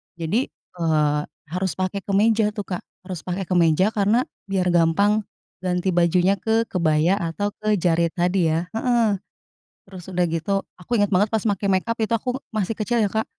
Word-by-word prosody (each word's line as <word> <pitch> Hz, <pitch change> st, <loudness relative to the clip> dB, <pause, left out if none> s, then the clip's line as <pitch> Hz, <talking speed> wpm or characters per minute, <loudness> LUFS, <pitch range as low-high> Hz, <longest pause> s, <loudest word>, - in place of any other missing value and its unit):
Jadi, 170 Hz, -, -1 dB, 0.3 s
eee, 150 Hz, -2 st, +2 dB, 0.3 s
harus 185 Hz, -1 st, -1 dB
pakai 185 Hz, +1 st, -1 dB
kemeja 210 Hz, +2 st, +2 dB
tuh, 205 Hz, -, -3 dB
Kak, 180 Hz, -, -4 dB, 0.2 s
harus 185 Hz, -2 st, -6 dB
pakai 185 Hz, +1 st, -3 dB
kemeja 175 Hz, +3 st, +3 dB
karena 215 Hz, +5 st, +2 dB, 0.2 s
biar 185 Hz, -2 st, +1 dB
gampang 200 Hz, +6 st, +3 dB, 0.3 s
ganti 180 Hz, 0 st, 0 dB
bajunya 175 Hz, +2 st, +3 dB
ke 225 Hz, 0 st, +2 dB
kebaya 165 Hz, 0 st, +2 dB
atau 205 Hz, +4 st, -2 dB
ke 215 Hz, 0 st, +1 dB
jarit 170 Hz, -1 st, +1 dB
tadi 180 Hz, 0 st, +2 dB
ya 165 Hz, +3 st, -1 dB
heeh. 240 Hz, +2 st, +1 dB, 0.9 s
Terus 190 Hz, -2 st, -10 dB
sudah 180 Hz, -1 st, +1 dB
gitu, 165 Hz, +3 st, -2 dB, 0.2 s
aku 230 Hz, +7 st, -2 dB
inget 205 Hz, -1 st, +2 dB
banget 205 Hz, +3 st, +3 dB
pas 220 Hz, -1 st, 0 dB
make 200 Hz, -1 st, 0 dB
mekap 195 Hz, +5 st, +1 dB
itu 215 Hz, -, 0 dB
aku 250 Hz, +4 st, -4 dB
masih 215 Hz, -1 st, -1 dB
kecil 230 Hz, +3 st, -1 dB
ya, 205 Hz, -2 st, +2 dB
Kak. 220 Hz, 0 st, 0 dB
190 Hz, 170 wpm, -23 LUFS, 175-210 Hz, 0.9 s, kemeja